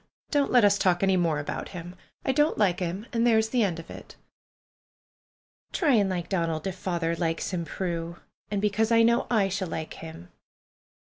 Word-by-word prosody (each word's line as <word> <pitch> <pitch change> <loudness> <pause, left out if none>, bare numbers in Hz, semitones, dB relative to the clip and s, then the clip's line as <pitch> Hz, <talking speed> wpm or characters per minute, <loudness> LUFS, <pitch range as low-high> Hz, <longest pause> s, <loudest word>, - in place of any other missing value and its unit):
Don't 285 -2 +2
let 245 -4 +6
us 200 0 +4
talk 180 0 +2
any 190 -1 +3
more 170 -4 +1
about 145 - -4
him. 175 +1 -8 0.3
I - - +2
don't 295 +4 +2
like 190 -5 +2
him, 185 +4 -3
and 230 - +1
there 225 -2 +5
is 220 0 +1
the 245 +1 +1
end 180 -5 0
of 165 - -10
it." - - -11 1.6
"Try 305 -7 +2
and 205 -4 +3
like 175 -2 -3
Donald, 165 -4 -1
if 190 - -2
father 170 -3 -2
likes 165 +1 -2
him, 175 -2 -2
Prue. 170 0 -4 0.3
And 205 -1 -2
because 215 +2 +1
I 230 0 +6
know 235 +1 +3
I 215 -5 +3
shall 190 0 -2
like 160 -1 -5
him." 160 - -10
190 Hz, 195 wpm, -27 LUFS, 170-220 Hz, 1.6 s, let